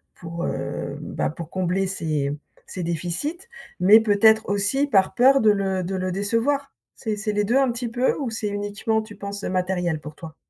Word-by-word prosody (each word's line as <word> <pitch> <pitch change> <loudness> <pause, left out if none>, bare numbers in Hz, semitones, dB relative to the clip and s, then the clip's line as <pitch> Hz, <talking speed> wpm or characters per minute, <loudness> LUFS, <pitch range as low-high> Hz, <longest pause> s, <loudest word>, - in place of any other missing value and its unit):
pour 170 0 -5
heu - - -4
bah, - - -2
pour 160 +1 -8
combler 185 +1 0
ses 155 -6 -1 0.4
ses 180 - -5
déficits, 175 - -3 0.4
mais 210 +5 +8
peut-être 220 +1 +4
aussi 205 +8 +1
par 195 -7 +3
peur 265 +2 +5
de 215 -1 +6
le 190 -2 0
de 190 +2 -3
le 185 -1 -2
décevoir. 235 +8 0 0.2
C'est 215 -3 -3
c'est 210 0 -2
les 205 0 +1
2 240 +6 +2
un 270 -2 +3
petit 240 -1 -4
peu 245 +2 +1
ou 270 -5 -2
c'est 220 -1 -3
uniquement, 205 +2 -1
tu 215 -1 -12
penses, 200 0 -6
matériel 180 -3 -1
pour 150 +1 -10
toi? 160 -1 -10
200 Hz, 190 wpm, -23 LUFS, 180-225 Hz, 0.4 s, mais